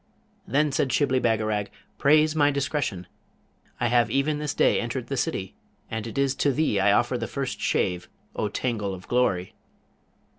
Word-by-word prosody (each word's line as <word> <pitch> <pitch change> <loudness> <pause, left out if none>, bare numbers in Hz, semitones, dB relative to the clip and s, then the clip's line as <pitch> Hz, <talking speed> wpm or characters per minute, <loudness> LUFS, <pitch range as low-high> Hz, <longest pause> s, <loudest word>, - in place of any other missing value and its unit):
Then 150 +1 +2
said 135 0 0
Shibli 130 -2 +2
Bagarag, 110 -3 0 0.3
'Praise 155 +2 +4
my 145 -2 +4
discretion! 140 - -2 0.7
I - - 0
have 120 0 +3
even 140 +5 0
this 150 -2 -3
day - - +3
entered - - -4
the - - -1
city, - - -2 0.4
and 110 0 -3
it 115 - -8
is 140 -1 +2
to 145 - +2
thee 135 -7 +1
I 100 +1 +4
offer 120 +4 +2
the 115 - -3
first 135 -2 -4
shave, 90 -1 0 0.3
O 105 - -1
tangle 105 -3 -2
of 90 - -13
glory!' 100 -8 +1
125 Hz, 170 wpm, -25 LUFS, 105-140 Hz, 0.7 s, Praise